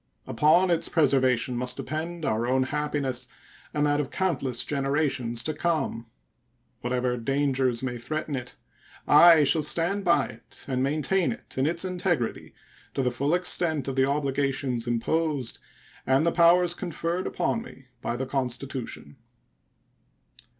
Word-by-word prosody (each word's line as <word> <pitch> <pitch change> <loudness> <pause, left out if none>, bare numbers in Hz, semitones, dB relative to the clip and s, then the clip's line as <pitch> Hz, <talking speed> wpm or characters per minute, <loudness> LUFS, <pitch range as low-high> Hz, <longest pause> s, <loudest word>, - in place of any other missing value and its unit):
Upon 175 +5 +3
its 170 -1 +1
preservation 130 -5 +2
must 125 +1 -2
depend 160 +3 -4
our 110 0 0
own 130 +1 +2
happiness 145 -2 -2 0.4
and 150 0 0
that 145 0 +2
of 135 - -5
countless 145 -9 -1
generations 135 -4 0
to 155 - -1
come. 150 -7 -2 0.7
Whatever 125 0 -1
dangers 130 -1 0
may 125 -2 -3
threaten 155 +3 -3
it, 125 -1 -6 0.5
I 160 +1 +8
shall 150 +3 +2
stand 170 +6 0
by 170 -6 +3
it 115 -1 -11
and 130 -2 -1
maintain 155 +4 +1
it - - -9
in 130 +2 +1
its 170 +3 0
integrity 175 -9 -2 0.4
to 135 - 0
the 125 - +1
full 140 +7 0
extent 170 -5 0
of 135 - -3
the 135 0 +2
obligations 135 -3 -1
imposed 135 +2 -1 0.4
and 135 +4 +2
the 170 - +3
powers 175 +1 +5
conferred 175 0 -3
upon 230 - -1
me 135 - -13
by 120 - -2
the 130 +2 -3
Constitution. 130 0 -4
140 Hz, 140 wpm, -26 LUFS, 130-165 Hz, 0.7 s, I